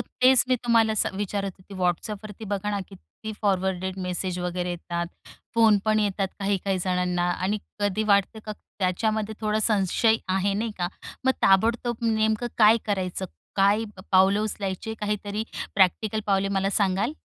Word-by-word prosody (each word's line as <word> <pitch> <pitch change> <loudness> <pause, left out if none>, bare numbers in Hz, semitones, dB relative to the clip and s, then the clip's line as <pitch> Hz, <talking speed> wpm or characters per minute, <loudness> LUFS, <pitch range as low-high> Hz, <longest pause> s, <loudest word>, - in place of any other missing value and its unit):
तेच 255 0 +4
मी 255 - +3
तुम्हाला 225 -2 +3
स 215 - +1
विचारत 200 -1 -2
होती. 195 +2 -13
WhatsAppवरती 205 +4 -2
बघा 205 +1 -1
ना 205 - -1
किती 210 +3 -10
फॉरवर्डेड 190 -1 0
मेसेज 180 0 -2
वगैरे 180 0 -2
येतात, 170 0 -3 0.5
फोन 220 -3 +5
पण 215 0 +3
येतात 195 -2 0
काही-काही 195 -1 0
जणांना 180 -1 0
आणि 190 +4 -1 0.2
कधी 205 +1 +1
वाटतं 200 +3 +2
का 215 - -3 0.3
त्याच्यामध्ये 215 +3 0
थोडा 215 0 0
संशय 215 +1 +3 0.2
आहे 195 +1 +1
नाही 220 +2 -1
का, 175 - 0 0.4
मग 260 - +4
ताबडतोब 230 +4 +3
नेमकं 220 +1 +1
काय 215 +1 +7
करायचं, 190 -2 -2 0.3
काय 200 +3 +3 0.3
पावलं 190 +2 +5
उचलायची, 210 0 -3
काहीतरी 210 0 -2 0.3
प्रॅक्टिकल 205 +3 +2
पावले 195 0 +2
मला 195 +1 0
सांगाल? 200 +7 +1
200 Hz, 145 wpm, -25 LUFS, 190-215 Hz, 0.5 s, काय